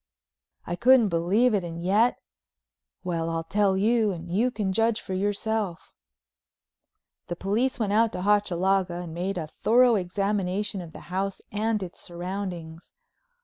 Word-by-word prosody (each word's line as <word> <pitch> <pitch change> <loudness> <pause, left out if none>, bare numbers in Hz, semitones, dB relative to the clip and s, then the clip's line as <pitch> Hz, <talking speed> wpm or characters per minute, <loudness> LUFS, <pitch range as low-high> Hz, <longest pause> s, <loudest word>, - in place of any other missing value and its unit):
I 175 - -3
couldn't 240 +1 +5
believe 190 +9 +2
it 200 -3 +1
and 170 -1 -6
yet—well, 165 - -3
I'll 165 0 -2
tell 195 +2 +1
you 220 +1 +2
and 170 -1 -7
you 225 +7 +2
can 205 -6 -2
judge 225 +1 +2
for 190 - -6
yourself. 205 -1 -2 1.3
The 175 - -3
police 215 +10 0
went 210 -5 -1
out 225 +1 +3
to 180 - -4
Hochalaga 190 -2 +2
and 170 -2 -7
made 180 +3 -3
a 165 - -2
thorough 240 +10 +3
examination 195 +1 -1
of 170 -2 -10
the - - -10
house 195 +1 -2
and 215 0 0
its 175 - -9
surroundings. 175 -2 -6
195 Hz, 145 wpm, -26 LUFS, 175-215 Hz, 1.3 s, couldn't